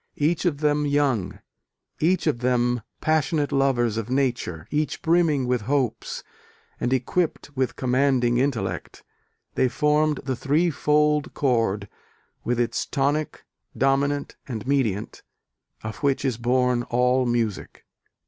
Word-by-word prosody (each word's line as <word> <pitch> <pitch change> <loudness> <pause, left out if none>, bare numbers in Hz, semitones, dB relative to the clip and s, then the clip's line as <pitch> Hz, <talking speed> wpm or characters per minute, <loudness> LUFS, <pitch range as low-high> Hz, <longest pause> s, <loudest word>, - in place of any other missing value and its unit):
Each 160 +5 +1
of 150 -4 0
them 150 -1 +2
young, 140 -9 0 0.6
each 175 +3 +2
of 150 -7 +1
them 120 -1 +1 0.2
passionate 155 -1 +1
lovers 125 -5 +1
of 115 0 -3
Nature, 120 - -1
each 150 +1 -1
brimming 165 -5 +3
with 125 -2 0
hopes, 135 -5 -1 0.6
and 120 - -1
equipped 145 +3 -1
with 130 -1 -1
commanding 125 -2 +2
intellect, 135 -3 -2 0.5
they 130 - +2
formed 150 +4 +2
the 130 -1 -2
three 155 +7 +1
fold 150 0 +1
chord, 115 -7 +1 0.6
with 120 0 -1
its 120 - -1
tonic, 145 +3 -1 0.3
dominant 140 +1 +1
and 115 -4 -5
mediant, 125 -7 -1 0.6
of 110 -1 -5
which 140 +3 0
is 130 -4 0
born 125 0 +2
all 125 +1 +1
music.... 115 -4 -2
135 Hz, 125 wpm, -24 LUFS, 120-145 Hz, 0.6 s, brimming